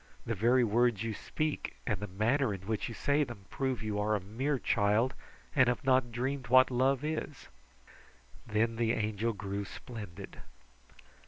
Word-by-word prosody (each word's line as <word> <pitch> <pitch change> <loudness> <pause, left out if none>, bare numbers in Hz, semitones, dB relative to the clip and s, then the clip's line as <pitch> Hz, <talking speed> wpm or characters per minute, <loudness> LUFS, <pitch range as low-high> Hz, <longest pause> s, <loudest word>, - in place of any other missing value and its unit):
The 115 - -1
very 120 +5 +3
words 115 0 +2
you 115 -1 -2
speak, 155 +8 -3
and 105 -6 -1
the 105 - -4
manner 110 +5 +1
in 95 - -10
which 110 +3 -2
you 115 - -7
say 145 +1 +2
them, 120 -7 -8
prove 130 -3 -1
that - - -6
you 105 -1 -1
are 105 +1 +1
a - - 0
mere 125 +9 -1
child, 115 +2 +2 0.4
and 130 -3 +5
have 125 - -1
not 130 -2 +3
dreamed 130 +2 -2
what 130 +1 +6
love 130 +2 +2
is." 155 -2 -4 1.0
Then 115 +2 +1
the 115 0 +2
Angel 110 +1 0
grew 100 -1 -4
splendid. 100 -3 -9
115 Hz, 170 wpm, -32 LUFS, 105-130 Hz, 1.0 s, what